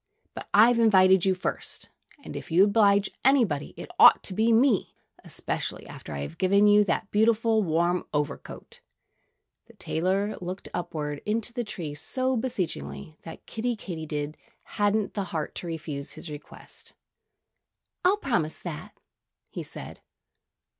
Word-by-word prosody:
But -, -, -8 dB
I've 230 Hz, +3 st, +6 dB
invited 190 Hz, -4 st, +5 dB
you 190 Hz, -1 st, +3 dB
first, 180 Hz, -, -4 dB, 0.3 s
and -, -, -8 dB
if -, -, -7 dB
you 170 Hz, +3 st, +5 dB
oblige 200 Hz, -1 st, +4 dB
anybody 235 Hz, -, +2 dB
it -, -, -8 dB
ought -, -, +8 dB
to 190 Hz, -, 0 dB
be 220 Hz, +4 st, +2 dB
me 230 Hz, -2 st, +3 dB, 0.3 s
especially -, -, -3 dB
after -, -, -10 dB
I've 70 Hz, +2 st, -6 dB
given 200 Hz, +2 st, +4 dB
you 210 Hz, 0 st, +6 dB
that 195 Hz, +3 st, -1 dB
beautiful 220 Hz, +1 st, +3 dB
warm 175 Hz, 0 st, 0 dB
overcoat." 150 Hz, -1 st, -4 dB, 0.9 s
The -, -, -17 dB
tailor 190 Hz, +5 st, -1 dB
looked 185 Hz, +2 st, -6 dB
upwards 150 Hz, -4 st, -4 dB
into 225 Hz, +2 st, -1 dB
the 240 Hz, -1 st, -2 dB
tree 175 Hz, -8 st, -5 dB
so 255 Hz, -, -1 dB
beseechingly 75 Hz, -, -4 dB
that 165 Hz, -, -11 dB
Kiddie 240 Hz, +2 st, -2 dB
Katydid 155 Hz, -6 st, -5 dB, 0.4 s
hadn't 205 Hz, 0 st, +2 dB
the 200 Hz, -2 st, -2 dB
heart 160 Hz, -4 st, -4 dB
to 175 Hz, -, -6 dB
refuse 155 Hz, -4 st, -5 dB
his 165 Hz, -, -7 dB
request. 150 Hz, 0 st, -10 dB, 1.1 s
"I'll 375 Hz, +3 st, +4 dB
promise 175 Hz, -, -1 dB
that," 160 Hz, -4 st, -7 dB, 0.5 s
he -, -, -5 dB
said. -, -, -9 dB
190 Hz, 140 wpm, -27 LUFS, 160-220 Hz, 1.1 s, ought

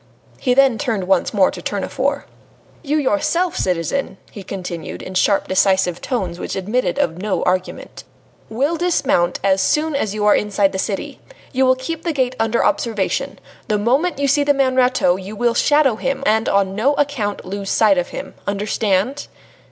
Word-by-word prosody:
Then 270 Hz, +1 st, +4 dB
he 230 Hz, -, -6 dB
turned 230 Hz, -9 st, -1 dB
once 185 Hz, -1 st, +1 dB
more 195 Hz, -4 st, +3 dB
to 180 Hz, -, -8 dB
Tournefort. 260 Hz, +10 st, -2 dB, 0.6 s
"You 300 Hz, -1 st, -1 dB
yourself, 305 Hz, -, 0 dB
citizen," 180 Hz, -, -1 dB
he 205 Hz, -, -9 dB
continued, 180 Hz, -4 st, -6 dB
in 185 Hz, -, -8 dB
sharp, 195 Hz, +2 st, +2 dB
decisive 190 Hz, -2 st, +2 dB
tones 185 Hz, -9 st, -3 dB
which -, -, -4 dB
admitted 205 Hz, +1 st, -1 dB
of 165 Hz, +1 st, -1 dB
no 210 Hz, -1 st, -1 dB
argument, 185 Hz, 0 st, -3 dB, 0.5 s
"will 280 Hz, +9 st, 0 dB
dismount 285 Hz, -, +1 dB
as 190 Hz, -1 st, +3 dB
soon 305 Hz, +9 st, +1 dB
as 215 Hz, -7 st, -1 dB
you 210 Hz, -1 st, -1 dB
are 210 Hz, -, +6 dB
inside 205 Hz, -1 st, +1 dB
the 190 Hz, -, -4 dB
city. 195 Hz, 0 st, -4 dB, 0.3 s
You 265 Hz, -1 st, +2 dB
will 255 Hz, -, +5 dB
keep 310 Hz, +5 st, -5 dB
the 335 Hz, -1 st, -2 dB
gate 260 Hz, -2 st, 0 dB
under 225 Hz, +1 st, +1 dB
observation. 215 Hz, -5 st, -1 dB, 0.3 s
The 210 Hz, -, +1 dB
moment 265 Hz, +11 st, +1 dB
you 280 Hz, 0 st, 0 dB
see 285 Hz, +2 st, +3 dB
the 285 Hz, 0 st, +2 dB
man 265 Hz, -2 st, +1 dB
Rateau, 250 Hz, -8 st, +3 dB
you 195 Hz, +3 st, -8 dB
will 235 Hz, +2 st, +1 dB
shadow 285 Hz, -2 st, +3 dB
him, 270 Hz, +3 st, -2 dB
and 220 Hz, +1 st, +2 dB
on 195 Hz, -1 st, +1 dB
no 250 Hz, +8 st, +1 dB
account 270 Hz, -9 st, -2 dB
lose 195 Hz, +1 st, -5 dB
sight 205 Hz, -4 st, +3 dB
of 175 Hz, -, -2 dB
him. -, -, -7 dB
Understand?" 205 Hz, +4 st, -1 dB
215 Hz, 175 wpm, -19 LUFS, 190-275 Hz, 0.6 s, are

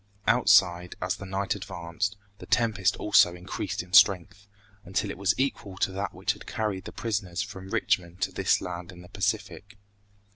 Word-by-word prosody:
Outside, 90 Hz, -7 st, +4 dB
as 90 Hz, 0 st, -1 dB
the 100 Hz, -1 st, -9 dB
night 95 Hz, +1 st, -1 dB
advanced, 95 Hz, +1 st, -4 dB, 0.2 s
the -, -, -10 dB
tempest 110 Hz, -6 st, +2 dB
also 90 Hz, -4 st, +4 dB
increased 90 Hz, 0 st, -4 dB
in 90 Hz, +1 st, -18 dB
strength, 100 Hz, +1 st, +4 dB, 0.4 s
until 95 Hz, 0 st, -2 dB
it -, -, -8 dB
was 100 Hz, +1 st, +2 dB
equal 105 Hz, -8 st, -2 dB
to 95 Hz, -, 0 dB
that 100 Hz, +1 st, -3 dB
which 95 Hz, +3 st, -1 dB
had 105 Hz, -, -14 dB
carried 105 Hz, -4 st, -3 dB
the -, -, -7 dB
prisoners 100 Hz, -5 st, -2 dB
from 95 Hz, -1 st, -9 dB
Richmond 90 Hz, -2 st, 0 dB
to -, -, 0 dB
this -, -, +1 dB
land 90 Hz, 0 st, -6 dB
in 90 Hz, -1 st, -13 dB
the 90 Hz, -, -14 dB
Pacific. 100 Hz, 0 st, -3 dB
95 Hz, 175 wpm, -27 LUFS, 90-100 Hz, 0.4 s, Outside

